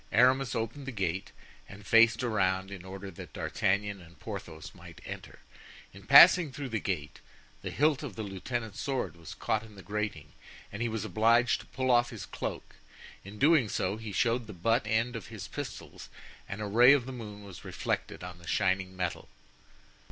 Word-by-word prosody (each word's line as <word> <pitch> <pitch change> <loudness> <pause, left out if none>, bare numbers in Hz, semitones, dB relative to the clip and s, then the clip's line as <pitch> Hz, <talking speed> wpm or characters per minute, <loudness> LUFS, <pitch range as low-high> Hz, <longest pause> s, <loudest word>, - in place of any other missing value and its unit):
Aramis 130 +2 +4
opened 115 +5 -3
the - - -3
gate 95 -4 -2 0.4
and 100 +1 -12
faced 115 +2 +5
around 95 -4 0
in 95 -3 -8
order 95 +1 -8
that 85 - -11
D'Artagnan 100 0 -1
and 85 0 -16
Porthos 85 -7 -7
might - - -13
enter. - - -8 0.6
In - - -14
passing 170 -6 +9
through 135 0 -6
the 115 -2 -1
gate, 80 -7 -4 0.4
the - - -4
hilt 150 0 +2
of 135 -10 -6
the 110 - -4
lieutenant's 105 +2 -4
sword 135 -8 -2
was 85 -2 -10
caught 110 - 0
in 110 -2 -14
the 95 - -12
grating 100 -6 -4 0.4
and 100 - -6
he 120 - 0
was 110 -1 -3
obliged 115 +4 +3
to 105 - -12
pull 130 0 -1
off 120 0 +4
his - - -7
cloak; - - -6 0.5
in 100 +2 -10
doing 145 -3 +4
so 95 +2 -1
he 110 -1 -7
showed 115 +2 +1
the 105 - -8
butt 115 +6 +1
end 115 +3 +1
of 115 - -6
his - - -8
pistols - - -8 0.4
and 100 +2 -5
a - - -2
ray 120 +6 +7
of 135 -4 +2
the 130 - -6
moon 105 -5 -8
was 95 -3 -11
reflected - - -3
on 90 -1 -8
the 85 - -14
shining 95 -1 0
metal. 90 -2 -3
105 Hz, 190 wpm, -30 LUFS, 95-120 Hz, 0.6 s, passing